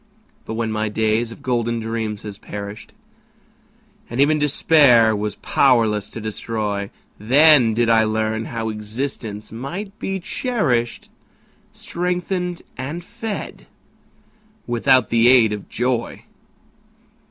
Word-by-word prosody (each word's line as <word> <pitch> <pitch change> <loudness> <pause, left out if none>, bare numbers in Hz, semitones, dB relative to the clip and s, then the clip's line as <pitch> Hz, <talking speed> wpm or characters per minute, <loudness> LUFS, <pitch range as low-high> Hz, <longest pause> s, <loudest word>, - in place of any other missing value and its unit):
But 110 - -5
when 115 -1 -2
my 110 0 -1
days 110 +2 0
of - - -12
golden 120 -2 0
dreams 110 -2 -4
had 105 -2 -8
perished, 100 +1 -8 1.2
And 120 - -5
even 150 +2 +4
Despair 140 -6 +4
was 105 0 -3
powerless 110 -6 +2
to - - -8
destroy, 105 -2 -3 0.3
Then 130 0 +5
did 120 0 +2
I 115 -1 +5
learn 110 +1 -1
how 115 -1 -3
existence 110 0 -5
might 175 - -6
be 195 0 -3
cherished, 165 - -1 0.6
Strengthened 180 0 -3 0.2
and 150 +7 -5
fed 225 +1 -6 1.0
without 125 +1 +3
the 115 0 +4
aid 120 -4 +6
of 105 -2 -7
joy. 120 -1 -2
115 Hz, 115 wpm, -21 LUFS, 110-140 Hz, 1.2 s, aid